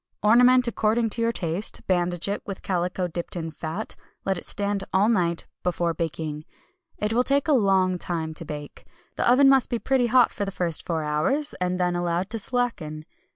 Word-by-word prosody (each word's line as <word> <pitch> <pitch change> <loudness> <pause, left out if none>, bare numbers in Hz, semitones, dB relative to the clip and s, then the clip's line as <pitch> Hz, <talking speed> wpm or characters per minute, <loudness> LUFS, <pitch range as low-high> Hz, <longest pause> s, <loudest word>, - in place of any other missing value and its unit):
Ornament 250 +3 +6
according 225 0 +1
to 230 - -1
your 230 0 +2
taste, 175 0 -1
bandage 175 -1 0
it 200 - -2
with 195 -2 -7
calico 180 0 -1
dipped 170 +1 -5
in 165 -2 -4
fat. 160 +7 -4 0.3
Let 195 - +1
it 175 - -8
stand 200 -1 -1
all 195 +3 +3
night 175 -7 +1 0.2
before 175 -1 0
baking. 155 -2 -4 0.5
It 210 +1 -1
will 245 +2 +3
take 280 +3 +1
a - - +3
long 190 -6 +3
time 160 -3 -3
to 160 - -8
bake. 150 -2 -8 0.3
The - - +3
oven 270 +2 +6
must 270 -2 +4
be 240 - 0
pretty 255 0 +1
hot 245 +1 +5
for 205 - -4
the 200 - -2
first 175 -4 -2
four 160 -2 -2
hours, 155 - 0
and 180 0 0
then 180 -1 +1
allowed 175 +2 -1
to 225 - -1
slacken. 195 -11 -2
185 Hz, 195 wpm, -25 LUFS, 170-230 Hz, 0.5 s, Ornament